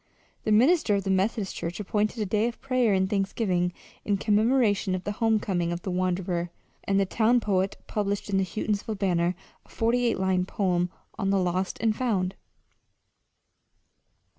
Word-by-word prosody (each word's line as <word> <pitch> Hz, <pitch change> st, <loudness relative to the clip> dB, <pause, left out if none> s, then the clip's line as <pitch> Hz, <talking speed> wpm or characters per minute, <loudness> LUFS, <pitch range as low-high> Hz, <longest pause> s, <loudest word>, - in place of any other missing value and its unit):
The 215 Hz, -, +1 dB
minister 245 Hz, -, +4 dB
of 200 Hz, -, -1 dB
the 195 Hz, -, -1 dB
Methodist 195 Hz, +1 st, 0 dB
church 170 Hz, +3 st, -4 dB
appointed 210 Hz, +2 st, -1 dB
a 210 Hz, -, 0 dB
day 210 Hz, +3 st, +1 dB
of 240 Hz, -, -6 dB
prayer 255 Hz, -4 st, +1 dB
and 190 Hz, -1 st, +2 dB
thanksgiving 195 Hz, -2 st, 0 dB, 0.3 s
in 205 Hz, -1 st, +1 dB
commemoration 210 Hz, -2 st, +2 dB
of 185 Hz, -, -5 dB
the 205 Hz, -, -2 dB
homecoming 205 Hz, -6 st, 0 dB
of 175 Hz, 0 st, -4 dB
the 190 Hz, -, -3 dB
wanderer; 180 Hz, -1 st, -1 dB, 0.4 s
and 195 Hz, 0 st, +2 dB
the 195 Hz, -, +3 dB
town 230 Hz, +5 st, +3 dB
poet 195 Hz, -3 st, 0 dB
published 205 Hz, -1 st, -2 dB
in 195 Hz, -1 st, +1 dB
the -, -, +2 dB
Houghtonsville 210 Hz, +3 st, -2 dB
Banner 180 Hz, -2 st, +1 dB, 0.3 s
a -, -, -26 dB
forty 240 Hz, +2 st, +1 dB
eight -, -, +1 dB
line 185 Hz, -1 st, +1 dB
poem 180 Hz, -4 st, 0 dB, 0.3 s
on 195 Hz, -, 0 dB
"The 200 Hz, -, +3 dB
Lost 185 Hz, 0 st, -1 dB
and 220 Hz, -1 st, +2 dB
Found." 195 Hz, -7 st, 0 dB
195 Hz, 165 wpm, -27 LUFS, 185-220 Hz, 0.4 s, minister